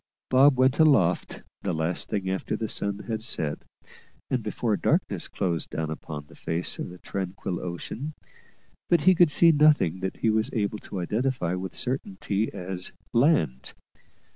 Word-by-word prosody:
Bob 130 Hz, +1 st, +6 dB
went 130 Hz, +3 st, +3 dB
aloft 110 Hz, -, +3 dB, 0.2 s
the 90 Hz, -4 st, -2 dB
last 80 Hz, +2 st, -1 dB
thing 100 Hz, -3 st, -2 dB
after 95 Hz, 0 st, -2 dB
the 110 Hz, -, -3 dB
sun 100 Hz, -1 st, -2 dB
had 110 Hz, -2 st, -3 dB
set, 80 Hz, -10 st, -2 dB, 0.7 s
and -, -, +1 dB
before -, -, -1 dB
darkness -, -, 0 dB
closed 85 Hz, -6 st, -2 dB
down 80 Hz, 0 st, -3 dB
upon 75 Hz, -1 st, -7 dB
the -, -, -18 dB
face 85 Hz, +2 st, -2 dB
of -, -, -4 dB
the 90 Hz, -, -10 dB
tranquil 95 Hz, -1 st, -4 dB
ocean, 115 Hz, -, -5 dB, 0.7 s
but 170 Hz, -3 st, +4 dB
he 185 Hz, +4 st, +6 dB
could 175 Hz, -2 st, +5 dB
see 165 Hz, +3 st, +6 dB
nothing 150 Hz, -, +4 dB
that 95 Hz, 0 st, -4 dB
he 110 Hz, -, +2 dB
was 110 Hz, 0 st, +1 dB
able 105 Hz, -1 st, -1 dB
to 95 Hz, -, -6 dB
identify 105 Hz, -1 st, -1 dB
with 95 Hz, +1 st, -5 dB
certainty 125 Hz, -, -2 dB
as 90 Hz, 0 st, -5 dB, 0.2 s
land. 115 Hz, -, +2 dB
100 Hz, 160 wpm, -26 LUFS, 90-130 Hz, 0.7 s, Bob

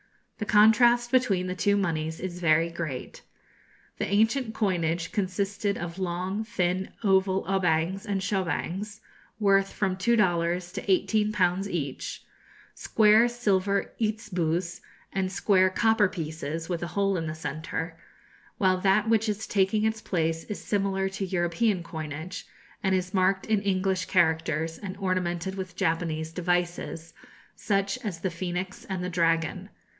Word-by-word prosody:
The 210 Hz, -, -2 dB
contrast 235 Hz, +3 st, +5 dB
between 220 Hz, -8 st, +2 dB
the 185 Hz, -, -2 dB
two 200 Hz, +2 st, +2 dB
moneys 160 Hz, -4 st, -1 dB
is 180 Hz, -1 st, -5 dB
very 165 Hz, 0 st, +3 dB
great. 160 Hz, -7 st, -5 dB, 0.8 s
The -, -, -1 dB
ancient 220 Hz, +4 st, +1 dB
coinage 170 Hz, -5 st, 0 dB
consisted 200 Hz, 0 st, -1 dB
of 175 Hz, +1 st, -6 dB
long 185 Hz, +3 st, -2 dB
thin 190 Hz, -4 st, -1 dB
oval 190 Hz, -1 st, +3 dB
obangs 190 Hz, +1 st, 0 dB
and 200 Hz, -1 st, 0 dB
shobangs, 195 Hz, +2 st, -2 dB, 0.4 s
worth 195 Hz, -2 st, +3 dB
from 190 Hz, -2 st, -1 dB
two 215 Hz, +6 st, +2 dB
dollars 175 Hz, -3 st, +1 dB
to 195 Hz, -, -3 dB
eighteen 210 Hz, +3 st, +2 dB
pounds 190 Hz, -1 st, +1 dB
each, 145 Hz, -7 st, -4 dB, 0.5 s
square 220 Hz, +2 st, +4 dB
silver 200 Hz, -5 st, 0 dB
itzeboos, 180 Hz, -6 st, -1 dB, 0.3 s
and 190 Hz, -1 st, -1 dB
square 190 Hz, -1 st, +3 dB
copper 220 Hz, +1 st, +3 dB
pieces, 160 Hz, -2 st, -5 dB
with 175 Hz, -2 st, -2 dB
a 175 Hz, -, -2 dB
hole 195 Hz, -1 st, +2 dB
in 160 Hz, -1 st, -3 dB
the 155 Hz, -, -4 dB
centre; 160 Hz, +2 st, -4 dB, 0.6 s
while 185 Hz, -2 st, +3 dB
that 195 Hz, +3 st, +3 dB
which 220 Hz, -1 st, +2 dB
is 210 Hz, +1 st, -2 dB
taking 205 Hz, +2 st, +1 dB
its 220 Hz, 0 st, -1 dB
place 165 Hz, -4 st, -1 dB
is 210 Hz, -, -5 dB
similar 195 Hz, -2 st, 0 dB
to 195 Hz, +1 st, -5 dB
European 175 Hz, +2 st, 0 dB
coinage, 160 Hz, +2 st, -6 dB, 0.3 s
and 190 Hz, -1 st, +2 dB
is 185 Hz, +1 st, -2 dB
marked 190 Hz, 0 st, +2 dB
in 215 Hz, -2 st, +1 dB
English 190 Hz, -1 st, 0 dB
characters, 160 Hz, -2 st, +1 dB
and 195 Hz, -2 st, -6 dB
ornamented 185 Hz, -1 st, -1 dB
with 190 Hz, -2 st, -6 dB
Japanese 160 Hz, -3 st, -1 dB
devices, 175 Hz, -2 st, -2 dB, 0.4 s
such 200 Hz, +4 st, 0 dB
as 180 Hz, -6 st, -4 dB
the 190 Hz, -, -1 dB
phoenix 180 Hz, +2 st, -4 dB
and 190 Hz, -2 st, -4 dB
the 180 Hz, -, -2 dB
dragon. 170 Hz, +2 st, 0 dB
185 Hz, 140 wpm, -27 LUFS, 170-205 Hz, 0.8 s, contrast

